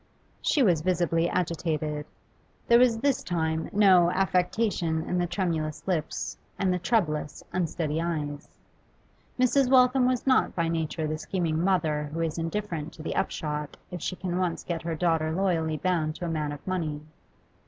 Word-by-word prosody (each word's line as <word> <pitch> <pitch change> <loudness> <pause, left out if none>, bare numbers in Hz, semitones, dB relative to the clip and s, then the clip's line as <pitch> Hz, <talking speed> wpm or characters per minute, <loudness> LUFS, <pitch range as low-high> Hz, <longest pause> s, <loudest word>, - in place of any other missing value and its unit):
She 290 - +3
was 175 -8 +3
visibly 170 -1 +1
agitated. 155 -4 -2 0.6
There 235 0 +6
was 245 -2 +4
this 280 -1 +2
time 160 -2 -1
no 190 -4 +5
affectation 180 -3 +1
in 180 +1 -1
the 175 - +1
tremulous 165 -5 -2
lips 170 -5 -2 0.2
and 190 -2 +1
the 180 - -1
troublous, 160 -8 0
unsteady 165 -3 -1
eyes. 150 -4 -3 0.9
Mrs. 255 +1 +3
Waltham 255 0 +5
was 255 -1 0
not 260 -1 +3
by 165 -1 0
nature 160 -1 -2
the 155 0 -2
scheming 165 -2 -1
mother 155 -6 +1
who 165 - -1
is 165 0 -2
indifferent 165 -2 -3
to 155 - -10
the - - -3
upshot 150 -1 -2
if 180 -2 -6
she 185 - -2
can 180 -1 -3
once 180 -2 -1
get 170 -2 -3
her 165 0 -3
daughter 160 -1 +1
loyally 165 -3 0
bound 160 -3 0
to 175 - -5
a - - -2
man 155 -2 -1
of 145 - -9
money. 160 -6 -2
170 Hz, 165 wpm, -27 LUFS, 155-185 Hz, 0.9 s, There